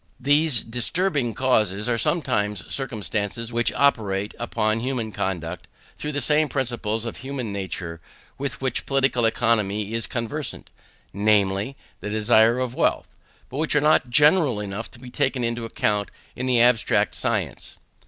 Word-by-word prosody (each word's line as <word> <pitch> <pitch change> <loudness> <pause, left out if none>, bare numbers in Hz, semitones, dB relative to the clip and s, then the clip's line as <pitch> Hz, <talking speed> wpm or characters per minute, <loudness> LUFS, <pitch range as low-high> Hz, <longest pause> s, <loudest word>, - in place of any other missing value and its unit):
These 145 -1 +3
disturbing 125 - 0
causes 105 -5 +1
are 120 -1 +1
sometimes 105 - 0
circumstances 115 -2 -2
which 120 0 +1
operate 105 -7 +1
upon 110 -2 0
human 120 -3 -2
conduct 90 -3 -4 0.3
through 150 0 -5
the 145 - -1
same 150 +2 +3
principle 120 -5 -1
of 115 - -5
human 130 -5 -5
nature 90 -4 -5 0.4
with 140 0 -4
which 130 -2 -2
Political 135 -3 +2
Economy 110 -3 +1
is 115 0 -2
conversant, 115 -2 -5 0.4
namely, 105 +4 +1 0.2
the 105 - -5
desire 110 +2 +4
of 125 -1 -2
wealth, - - 0 0.4
but 130 - -8
which 155 0 0
are - - +6
not 150 -4 +3
general 150 - +4
enough 105 +2 -5
to - - -11
be 125 0 -11
taken 130 -1 0
into 115 0 -2
account 105 -2 -1 0.3
in 130 +1 -3
the 125 -2 +3
abstract 120 -2 +3
science. - - -3
115 Hz, 145 wpm, -24 LUFS, 105-135 Hz, 0.4 s, are